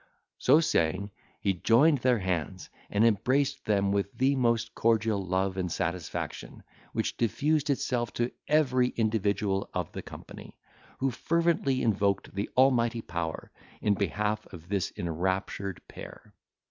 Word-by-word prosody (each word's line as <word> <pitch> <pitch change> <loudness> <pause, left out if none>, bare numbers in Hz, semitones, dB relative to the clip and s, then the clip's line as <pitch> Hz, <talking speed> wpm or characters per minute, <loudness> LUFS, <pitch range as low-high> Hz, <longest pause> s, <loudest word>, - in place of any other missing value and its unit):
So 155 - +5
saying, 100 - 0 0.3
he 100 - +2
joined 130 - +4
their 125 0 +3
hands, 90 -2 -3 0.2
and 105 +2 +3
embraced 130 +6 +1
them 100 -2 +2
with 100 0 0
the 135 +2 +3
most 115 -2 +1
cordial 110 -3 +1
love 95 +1 -1
and 90 -2 -2
satisfaction, 85 -1 -4 0.3
which - - -2
diffused 145 +7 +1
itself 125 -4 0
to 120 +1 -1 0.2
every 130 -5 +3
individual 105 -3 0
of - - -2
the - - -6
company, - - -11 0.4
who 135 0 0
fervently 165 -2 +1
invoked 100 -3 +1
the 100 +2 -3
Almighty 120 -3 +3
Power, 85 -2 -4 0.3
in 105 - +2
behalf 105 +2 -2
of 85 -1 -11
this 100 -2 -1
enraptured 95 +2 -2
pair. - - -11
105 Hz, 135 wpm, -29 LUFS, 95-125 Hz, 0.4 s, So